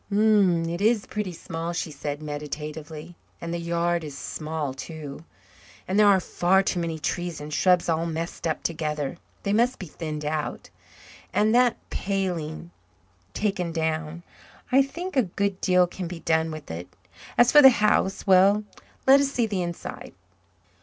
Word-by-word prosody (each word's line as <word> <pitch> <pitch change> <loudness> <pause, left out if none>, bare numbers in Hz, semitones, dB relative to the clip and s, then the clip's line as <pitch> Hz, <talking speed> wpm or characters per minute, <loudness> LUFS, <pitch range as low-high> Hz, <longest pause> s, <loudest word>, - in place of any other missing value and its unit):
"It 195 -5 +3
is 220 0 +3
pretty 210 -3 -3
small," 165 0 -5
she 170 -2 -3
said 145 0 -5
meditatively. 150 +2 -6 0.2
"And 170 0 -5
the 170 - -2
yard 170 0 0
is 145 -3 -7
small 155 -3 -4
too 150 +1 -8 0.6
and 190 +3 +1
there 210 - +7
are 195 -2 +6
far 185 +2 +2
too 185 - -1
many 165 -2 -2
trees 175 +1 -3
and 150 +1 -7
shrubs 180 +2 +3
all 165 0 0
messed 165 +1 -4
up 160 - -2
together. 150 -2 -2 0.3
They 200 - 0
must 240 +4 +2
be 190 - -7
thinned 155 -2 -6
out 150 0 -3 0.6
and 215 +1 +2
that 245 -1 +4
paling 175 -4 -3 0.6
taken 195 -5 -1
down. 160 0 -2 0.5
I 265 +2 +6
think 340 +7 -4
a 260 - +5
good 200 -1 -2
deal 180 -1 +4
can 180 0 -6
be 170 -1 -7
done 160 0 +1
with 155 -2 -8
it. 85 +2 -6 0.5
As 240 0 +6
for 295 - +9
the 265 - +11
house 210 -4 +1
well, 195 +2 +5 0.4
let 270 +1 +7
us 275 -1 0
see 240 -4 +1
the 200 -4 -2
inside." 175 -1 -6
170 Hz, 160 wpm, -25 LUFS, 155-200 Hz, 0.6 s, the